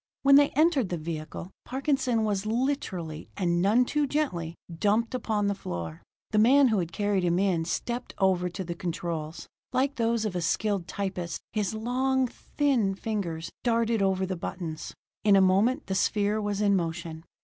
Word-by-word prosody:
When 275 0 +6
they 285 +1 +7
entered 300 - +3
the 175 - -2
vehicle, 160 +2 -6
Parkinson 265 -4 0
was 205 -1 -1
literally, 215 - -2
and 175 -2 +1
none 220 +7 +4
too 295 +2 0
gently, 175 - -1 0.2
dumped 210 +7 +1
upon 220 -4 0
the 200 - +2
floor. 85 - -6 0.3
The 215 - +3
man 260 +4 +6
who 215 -3 +2
had 170 -2 -3
carried 205 +1 0
him 175 -1 +1
stepped 240 +8 -3
over 185 -2 +2
to 190 +2 -5
the 170 -1 -4
controls. 170 -2 -4 0.3
Like 275 +3 0
those 230 -1 +1
of 205 -4 -2
a 175 - -1
skilled 200 +2 0
typist, 185 -4 -3
his 215 -1 -1
long, 260 +4 +1
thin 245 -5 0
fingers 175 -7 -3
darted 230 -2 +2
over 190 -1 +2
the 185 0 -3
buttons. 170 -2 -6 0.3
In 205 -2 +6
a - - +7
moment 200 +9 +3
the 190 - -3
sphere 205 +2 +1
was 205 0 -2
in 200 -1 +4
motion. 165 -2 -3
200 Hz, 170 wpm, -28 LUFS, 175-235 Hz, 0.3 s, they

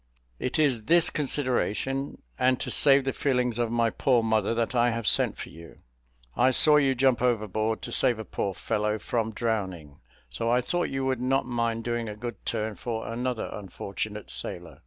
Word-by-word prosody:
It 125 - -2
is 135 -8 +2
this 170 +3 +4
consideration, 135 -1 -1 0.2
and 130 0 +3
to - - -3
save 140 -1 +5
the 135 - -2
feelings 125 -4 0
of 115 -1 0
my 115 -1 +1
poor 125 -4 +2
mother, 110 0 +1
that 115 +1 -1
I 120 -1 +3
have 115 -1 -3
sent - - +2
for - - -7
you. 85 +1 -13 0.6
I 130 - +4
saw 150 +3 +5
you 135 -2 +3
jump 130 -2 +2
overboard 110 -2 0
to - - -6
save 120 - +3
a 110 - -6
poor 100 -1 -3
fellow 105 +1 -1
from 110 0 -2
drowning; 95 -10 -3 0.3
so 65 - -3
I 120 +1 +3
thought 175 +8 -1
you 135 0 -2
would 130 -2 -1
not 135 +2 +1
mind 115 -2 -1
doing 120 -1 -2
a 105 - -6
good 120 +2 -7
turn 110 -1 -2
for 115 -2 -4
another 125 0 -2
unfortunate 105 +1 -6
sailor. 85 -2 -4
120 Hz, 185 wpm, -27 LUFS, 110-130 Hz, 0.6 s, save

